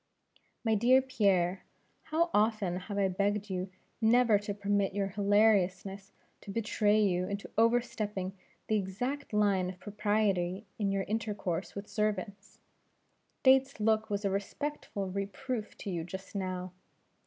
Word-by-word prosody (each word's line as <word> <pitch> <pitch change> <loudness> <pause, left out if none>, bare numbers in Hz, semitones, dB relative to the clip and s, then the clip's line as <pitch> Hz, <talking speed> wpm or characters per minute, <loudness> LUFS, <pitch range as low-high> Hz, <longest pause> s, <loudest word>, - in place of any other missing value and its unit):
"My 225 -2 +2
dear 240 +5 +5
Pierre, 200 -8 +1 0.4
how 330 +2 +1
often 210 -4 +2
have 205 -2 -4
I 200 -1 +3
begged 200 +2 -1
you 185 0 -2 0.3
never 225 -1 +5
to 205 0 -5
permit 200 -1 0
your 200 -1 0
hilariousness 200 -1 +2 0.3
to - - -12
betray 215 0 +2
you 185 -3 +2
into 200 0 -5
overstepping 215 -4 +1 0.3
the 215 - +1
exact 245 +9 -3
line 200 -4 +2
of 185 -1 -9
propriety 205 -2 0
in 200 -2 +1
your 195 0 0
intercourse 205 -5 -3
with 200 +1 -6
servants. 205 -2 -3 0.9
Dates' 265 -1 +4
look 220 +1 +2
was 205 0 -2
a 195 - +1
respectful 200 0 -3
reproof 210 +4 -4
to 200 - -5
you 170 -2 -2
just 190 +3 -8
now. 185 -2 -3
205 Hz, 135 wpm, -31 LUFS, 195-220 Hz, 0.9 s, dear